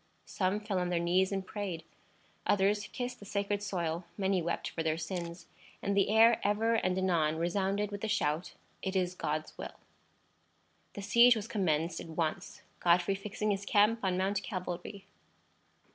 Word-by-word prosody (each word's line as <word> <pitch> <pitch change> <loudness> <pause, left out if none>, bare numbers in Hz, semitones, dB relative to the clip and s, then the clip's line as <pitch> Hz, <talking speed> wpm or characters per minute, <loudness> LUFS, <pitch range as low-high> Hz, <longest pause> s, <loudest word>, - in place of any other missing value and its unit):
Some 190 +2 0
fell 210 -3 -2
on 180 0 -1
their 175 - +1
knees 180 +3 +2
and 195 -1 -2
prayed; 190 -5 -4 0.6
others 205 +1 +2
kissed 245 0 -5
the 205 - -11
sacred 200 0 -1
soil; 175 -4 -2
many 190 -2 +1
wept 170 +1 -2
for 165 - -3
their 160 -1 0
sins; 170 +1 -5 0.3
and 200 0 -1
the 200 0 +3
air 225 +2 +6
ever 215 +3 +2
and 185 -5 +1
anon 170 -5 +2
resounded 195 +5 0
with 200 0 -5
the 220 - -1
shout: 155 -4 -1 0.3
"It 190 0 -3
is 180 -1 +1
God's 155 -3 -3
will!" - - -7 1.1
The 200 - -7
siege 235 +4 +6
was 215 -1 -4
commenced 170 -6 0
at - - -7
once, 160 -1 -3 0.2
Godfrey 175 +2 +3
fixing 210 +2 -2
his 195 0 -2
camp 210 +3 +3
on 185 -2 +1
Mount 195 +2 0
Calvary. 185 0 -5
190 Hz, 165 wpm, -32 LUFS, 175-205 Hz, 1.1 s, air